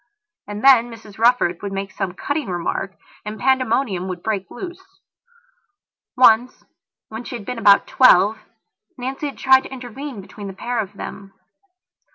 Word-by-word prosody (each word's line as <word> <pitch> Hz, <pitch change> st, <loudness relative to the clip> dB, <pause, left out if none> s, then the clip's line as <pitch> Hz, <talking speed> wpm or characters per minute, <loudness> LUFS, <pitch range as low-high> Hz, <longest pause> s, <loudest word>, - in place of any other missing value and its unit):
And 205 Hz, +2 st, -6 dB
then 250 Hz, -3 st, +6 dB
Mrs 220 Hz, -2 st, -13 dB
Rufford 230 Hz, -7 st, +3 dB
would 200 Hz, -, -5 dB
make 195 Hz, 0 st, -4 dB
some 190 Hz, -2 st, -4 dB
cutting 285 Hz, +8 st, -3 dB
remark 185 Hz, +2 st, -3 dB, 0.3 s
and 210 Hz, 0 st, -7 dB
pandemonium 255 Hz, -6 st, +1 dB
would 180 Hz, -2 st, -6 dB
break 200 Hz, -4 st, -2 dB
loose. 355 Hz, +6 st, -8 dB, 1.4 s
Once, 245 Hz, 0 st, +4 dB, 0.4 s
when 220 Hz, +2 st, -7 dB
she 245 Hz, -, -7 dB
had 220 Hz, -4 st, -8 dB
been 250 Hz, +1 st, -5 dB
about 200 Hz, -3 st, +5 dB
twelve, 215 Hz, -4 st, +5 dB, 0.6 s
Nancy 265 Hz, +4 st, -4 dB
had 280 Hz, -, -8 dB
tried 265 Hz, 0 st, +5 dB
to -, -, -11 dB
intervene 260 Hz, 0 st, -7 dB
between 200 Hz, +1 st, -10 dB
the 195 Hz, -, -7 dB
pair 240 Hz, +4 st, -3 dB
of 205 Hz, -3 st, -4 dB
them. 195 Hz, -1 st, -9 dB
225 Hz, 155 wpm, -21 LUFS, 195-255 Hz, 1.4 s, then